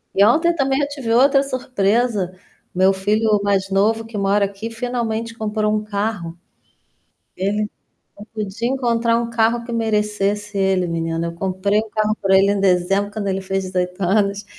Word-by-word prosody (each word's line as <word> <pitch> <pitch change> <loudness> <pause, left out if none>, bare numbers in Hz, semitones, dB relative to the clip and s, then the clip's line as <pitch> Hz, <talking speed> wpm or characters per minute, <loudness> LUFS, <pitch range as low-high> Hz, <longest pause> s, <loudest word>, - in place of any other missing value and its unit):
E 200 - +5
ontem 330 +10 +4
também 270 -1 +1
eu 285 - +1
tive 270 -6 -4
outra 275 +3 +5
surpresa. 225 -7 0 0.4
Meu 190 +1 +4
filho 210 +2 +1
mais 195 -1 0
novo 220 +3 +2
que 225 -1 -11
mora 200 0 +2
aqui 200 +3 -6
finalmente 230 -1 -3
comprou 215 -1 -1
um 215 0 0
carro. 200 -5 -3 1.0
Ele 210 +3 -1 0.5
eu 210 - -10
pude 215 +2 -3
encontrar 235 -3 +1
um 235 0 -2
carro 230 +1 +1
que 240 - -8
merecesse 210 -2 -1
ele 190 -2 +1
menina, 165 0 -2
eu - - -5
comprei 190 +3 0
o 220 0 -2
carro 215 0 0
pra 195 -1 +3
ele 195 +1 +4
em 200 - +1
dezembro 195 +2 +1
quando 210 -2 -3
ele 195 0 -1
fez 190 0 -2
18 180 0 -3
anos, 200 +2 +1
210 Hz, 170 wpm, -20 LUFS, 195-230 Hz, 1.0 s, E